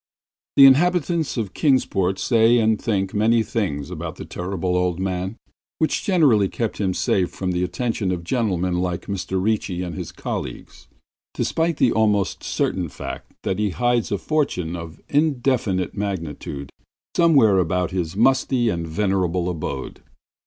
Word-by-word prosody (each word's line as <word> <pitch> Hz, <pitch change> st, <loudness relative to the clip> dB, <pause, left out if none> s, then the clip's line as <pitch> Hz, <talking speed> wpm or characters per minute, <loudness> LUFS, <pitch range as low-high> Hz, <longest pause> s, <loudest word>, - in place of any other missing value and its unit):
The 140 Hz, -, +9 dB
inhabitants 165 Hz, +2 st, +3 dB
of 105 Hz, -5 st, -3 dB
Kingsport 95 Hz, -, +1 dB
say 115 Hz, +2 st, +4 dB
and 110 Hz, -2 st, +2 dB
think 95 Hz, -3 st, -1 dB
many 110 Hz, +2 st, +3 dB
things 90 Hz, -10 st, -3 dB
about 85 Hz, -2 st, -5 dB
the -, -, -8 dB
Terrible 90 Hz, 0 st, -3 dB
Old 90 Hz, -1 st, 0 dB
Man 95 Hz, +2 st, -3 dB, 0.4 s
which 160 Hz, -, 0 dB
generally 135 Hz, -, +3 dB
keep 115 Hz, -3 st, -3 dB
him 95 Hz, -3 st, -1 dB
safe 90 Hz, -2 st, +1 dB
from 95 Hz, -1 st, -3 dB
the 90 Hz, 0 st, 0 dB
attentions 110 Hz, 0 st, -1 dB
of 90 Hz, -2 st, -3 dB
gentlemen 90 Hz, -4 st, 0 dB
like 90 Hz, -1 st, -2 dB
Mr. 95 Hz, -1 st, -2 dB
Ricci 95 Hz, -3 st, -1 dB
and 90 Hz, -2 st, -5 dB
his -, -, -6 dB
colleagues, -, -, -6 dB, 0.5 s
despite 165 Hz, -1 st, 0 dB
the 120 Hz, -, +3 dB
almost 105 Hz, -3 st, +1 dB
certain 90 Hz, -3 st, -1 dB
fact -, -, -8 dB
that 95 Hz, -, -1 dB
he 105 Hz, -1 st, +1 dB
hides 120 Hz, +3 st, 0 dB
a 100 Hz, -, +1 dB
fortune 95 Hz, -, -1 dB
of 85 Hz, -2 st, -8 dB
indefinite 130 Hz, -, +1 dB
magnitude 85 Hz, -8 st, -4 dB, 0.4 s
somewhere 135 Hz, -, +5 dB
about 90 Hz, +1 st, 0 dB
his 90 Hz, -1 st, -3 dB
musty 130 Hz, 0 st, +3 dB
and 85 Hz, -4 st, -2 dB
venerable 90 Hz, -1 st, 0 dB
abode. 75 Hz, -5 st, -5 dB
100 Hz, 145 wpm, -22 LUFS, 90-120 Hz, 0.5 s, The